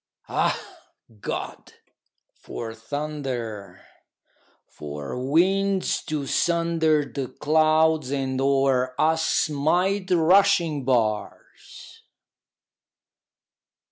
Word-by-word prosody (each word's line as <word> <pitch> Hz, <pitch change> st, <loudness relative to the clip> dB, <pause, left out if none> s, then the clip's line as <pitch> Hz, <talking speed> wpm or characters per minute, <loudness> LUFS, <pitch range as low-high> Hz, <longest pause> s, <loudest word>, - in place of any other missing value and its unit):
Ah, -, -, 0 dB, 0.6 s
God! -, -, -6 dB, 0.6 s
for 115 Hz, -2 st, -8 dB
thunder! 125 Hz, -4 st, -5 dB, 0.8 s
for 75 Hz, -1 st, -8 dB
winds 190 Hz, +7 st, +1 dB
to 150 Hz, -2 st, -3 dB
sunder 165 Hz, -1 st, +1 dB
The 135 Hz, -2 st, -5 dB
clouds 155 Hz, 0 st, +2 dB
and 135 Hz, -1 st, -2 dB
o'er 135 Hz, -2 st, +1 dB
us 160 Hz, +1 st, +2 dB
smite 180 Hz, +8 st, 0 dB
rushing 175 Hz, -3 st, +3 dB
bars! 110 Hz, -5 st, -3 dB
150 Hz, 70 wpm, -24 LUFS, 130-165 Hz, 0.8 s, rushing